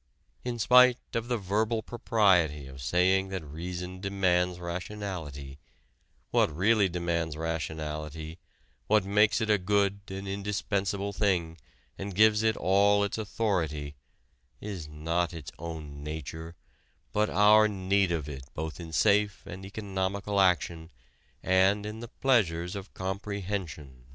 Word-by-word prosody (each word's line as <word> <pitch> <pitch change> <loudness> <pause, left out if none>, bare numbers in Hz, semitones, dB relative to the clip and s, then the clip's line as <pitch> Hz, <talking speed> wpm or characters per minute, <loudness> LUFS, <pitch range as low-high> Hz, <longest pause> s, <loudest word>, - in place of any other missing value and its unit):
In 125 -1 -3
spite 125 +2 +6 0.2
of 115 0 -2
the 120 -1 0
verbal 110 +3 0
propriety 95 - +2
of 65 0 -10
saying 95 +7 +2
that 95 -3 -4
reason 90 +4 -6
demands 90 -3 +1
rationality, 85 -6 -6 0.7
what - - +3
really 100 +5 +3
demands 85 -2 -2
rationality, 80 0 -4 0.5
what 105 -2 +3
makes 105 +3 +3
it 110 -1 +1
a 105 - +4
good 100 +1 +1
and 95 0 -6
indispensable 100 0 -2
thing 90 -6 0 0.4
and 100 -1 -5
gives 110 +1 +5
it 110 -1 +2
all 100 +3 +4
its 100 +2 -2
authority, 90 -9 -1 0.7
is 95 -7 -6
not 80 +3 -2
its 75 -5 -8
own 75 -3 -7
nature, 80 +2 -6 0.6
but 105 +1 +2
our 105 +2 +6
need 100 -1 +1
of 80 -4 -2
it 70 -3 -7
both 80 +2 -5
in 85 -2 -8
safe 100 +3 +2
and 95 +2 -8
economical 100 0 -2
action 85 -3 +1 0.5
and 95 +2 +3
in 105 +1 -6
the 120 - -7
pleasures 95 -9 +1
of 100 0 -7
comprehension." 95 - -5
95 Hz, 130 wpm, -29 LUFS, 80-105 Hz, 0.7 s, spite